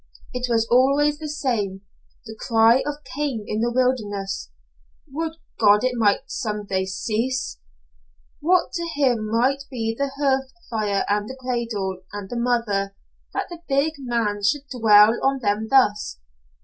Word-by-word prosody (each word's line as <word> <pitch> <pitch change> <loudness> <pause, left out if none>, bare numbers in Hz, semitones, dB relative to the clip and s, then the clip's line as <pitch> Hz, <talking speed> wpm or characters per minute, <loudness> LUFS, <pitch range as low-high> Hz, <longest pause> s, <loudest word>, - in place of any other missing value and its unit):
It 250 0 -2
was 225 -1 +2
always 280 +4 +4
the 310 -1 -5
same 215 -10 -2 0.4
the 220 -1 -8
cry 230 +3 +4
of 295 0 -4
Cain 275 -7 -2
in 215 - -2
the 240 +1 +1
wilderness. 210 - -1 0.6
Would 320 +3 -3 0.3
God 210 0 +5
it 255 - +2
might 215 -2 +3
some 210 -6 -4
day 190 -1 -1
cease! 225 - -2 0.8
What 355 +4 +2
to 340 - -3
him 245 -7 +1
might 260 +5 +1
be 225 -3 -2
the 280 +3 -1
hearth 270 -2 +1 0.2
fire 210 -3 0
and 205 +1 0
the 260 - -7
cradle, 230 -7 -3
and 205 -1 -6
the - - -3
mother, 215 -5 0 0.4
that - - 0
the 340 -1 -8
big 280 +3 +2
man 230 -5 -1
should 265 +8 +1
dwell 220 -2 +6
on 270 0 +2
them 210 +1 0
thus? 210 - +3
235 Hz, 150 wpm, -23 LUFS, 210-270 Hz, 0.8 s, dwell